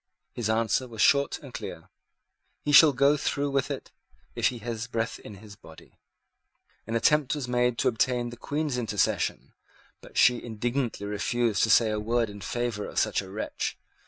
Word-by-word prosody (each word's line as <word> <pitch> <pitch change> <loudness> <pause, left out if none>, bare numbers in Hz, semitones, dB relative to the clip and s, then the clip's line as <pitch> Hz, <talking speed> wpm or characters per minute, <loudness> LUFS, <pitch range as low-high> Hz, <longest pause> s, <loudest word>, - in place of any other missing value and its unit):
His 115 -3 -3
answer 115 +3 +1
was 115 -2 -11
short 140 +4 +3
and - - -11
clear: - - -7 0.8
"He 145 - -1
shall 150 +1 +9
go 140 +2 +3
through 140 0 -1
with 135 -1 0
it, - - -6 0.4
if - - +2
he 125 - -3
has 115 0 -5
breath 115 -1 -3
in 105 - -11
his 105 +1 -13
body." 80 -7 -17 0.9
An 115 - -3
attempt 150 +4 +2
was 140 -4 -4
made 125 -1 +1
to - - +1
obtain 120 +1 0
the - - -8
Queen's 145 +1 -2
intercession; 105 -5 -1 0.5
but - - -12
she 125 -1 +5
indignantly 120 0 -3
refused 110 +2 0
to - - -4
say 110 0 +5
a 105 - -1
word 115 0 0
in 100 0 -11
favour 115 +2 -3
of - - -10
such - - +1
a 95 - -11
wretch. 105 +3 -4
120 Hz, 180 wpm, -27 LUFS, 110-125 Hz, 0.9 s, shall